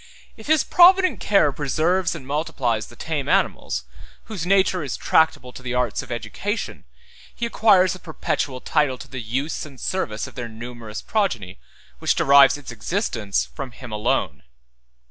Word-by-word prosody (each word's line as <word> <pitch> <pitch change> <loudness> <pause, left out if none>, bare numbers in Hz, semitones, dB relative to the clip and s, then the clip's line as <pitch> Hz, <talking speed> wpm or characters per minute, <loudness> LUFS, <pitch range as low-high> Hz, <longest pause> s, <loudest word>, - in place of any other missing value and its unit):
If 220 - -13
his 310 -1 +4
provident 370 +1 +5
care 195 -8 +3
preserves 160 +7 0
and 145 -6 -9
multiplies 130 -6 -1
the 120 - -15
tame 150 +1 -3
animals, - - 0 0.4
whose 185 -6 -5
nature 190 -1 +3
is 140 -4 -4
tractable 145 -5 +2
to - - -10
the 125 0 -4
arts 125 -1 0
of - - -11
education, 120 - -4 0.5
he 235 - -2
acquires 195 -6 +4
a 185 - -9
perpetual 140 -5 -3
title 145 -4 +1
to - - -11
the 130 -2 -6
use 130 +8 -3
and 140 -4 -11
service 110 -13 -2
of - - -11
their 120 -2 -6
numerous 115 -1 -8
progeny, 120 - -1 0.4
which - - +1
derives 140 0 +6
its 145 - -9
existence 115 - -1
from 135 -4 -8
him 125 -2 -10
alone. 105 0 -1
140 Hz, 160 wpm, -22 LUFS, 120-185 Hz, 0.5 s, derives